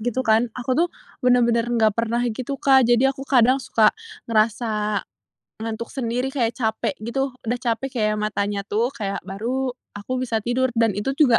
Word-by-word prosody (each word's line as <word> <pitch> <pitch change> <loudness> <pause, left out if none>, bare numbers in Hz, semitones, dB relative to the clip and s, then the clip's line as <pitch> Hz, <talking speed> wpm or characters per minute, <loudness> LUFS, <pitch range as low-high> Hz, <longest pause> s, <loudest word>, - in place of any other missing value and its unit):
gitu 245 +3 -1
kan. 225 +2 +3
Aku 250 +1 -2
tuh 345 - +4 0.3
benar-benar 240 -2 +3
nggak 220 -3 +2
pernah 235 +1 +1
gitu, 255 +5 -4
Kak, 265 -2 +5
jadi 245 +3 +4
aku 270 +1 -9
kadang 255 0 +5
suka 220 -3 +3 0.4
ngerasa 215 -1 +1 0.6
ngantuk 225 +1 -4
sendiri 250 0 -1
kayak 235 -4 +1
capek 220 +3 -1
gitu. 270 +5 -2 0.2
Udah 240 +2 0
capek 240 +1 -2
kayak 215 0 +1
matanya 205 -1 -1
tuh 230 +4 0
kayak 200 -6 -4
baru 240 +7 -2 0.3
aku 255 +6 -3
bisa 225 -4 -1
tidur 255 +2 +1
dan 230 -3 +3
itu 270 +6 -1
juga 255 -7 +5
235 Hz, 170 wpm, -23 LUFS, 220-255 Hz, 0.6 s, Kak